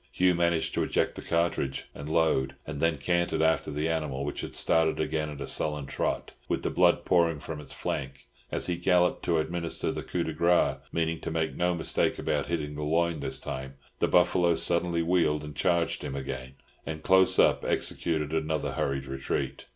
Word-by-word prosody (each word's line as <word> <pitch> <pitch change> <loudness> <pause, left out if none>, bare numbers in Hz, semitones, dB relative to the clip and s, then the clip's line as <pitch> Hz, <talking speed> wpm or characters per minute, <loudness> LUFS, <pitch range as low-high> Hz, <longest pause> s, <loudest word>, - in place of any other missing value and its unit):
Hugh 90 0 +3
managed 85 -1 +1
to - - 0
eject - - +1
the - - -8
cartridge 85 -5 -1
and 70 +1 -7
load, 80 -5 +2
and 75 -2 -5
then 80 -1 +2
cantered 85 +3 +1
after 80 -1 +2
the 75 +2 -1
animal, 75 -4 -2
which 75 - -3
had - - -7
started 80 -1 +2
again 80 -1 -1
at 75 -2 -8
a - - -4
sullen 75 -2 0
trot, 70 - -2 0.2
with - - -1
the - - -1
blood 90 0 +3
pouring 85 -4 +3
from 75 0 -6
its - - -8
flank. 70 0 -4 0.3
As - - +1
he 90 -1 -1
galloped 90 0 +3
up - - -24
to 85 - +2
administer 85 +1 -2
the - - -4
"coup 90 - -2
de 80 - -3
grace," 85 +3 +3
meaning 80 0 -1
to - - -4
make 80 -1 -1
no 90 0 +1
mistake 80 - 0
about 75 -3 -1
hitting 75 -3 -2
the 75 +1 -5
loin 85 +1 +1
this 65 -2 -2
time, 65 +1 -6 0.2
the - - +2
buffalo 90 -1 +4
suddenly 85 0 +1
wheeled 80 -3 +2
and 75 -1 -8
charged 85 +1 +1
him 70 - -4
again, 65 -1 -5 0.3
and 80 -1 -6
Close 95 0 +4
Up - - +4
executed 80 -2 -1
another 80 -1 -1
hurried 70 -1 -2
retreat. 65 0 -3
80 Hz, 195 wpm, -28 LUFS, 75-85 Hz, 0.3 s, buffalo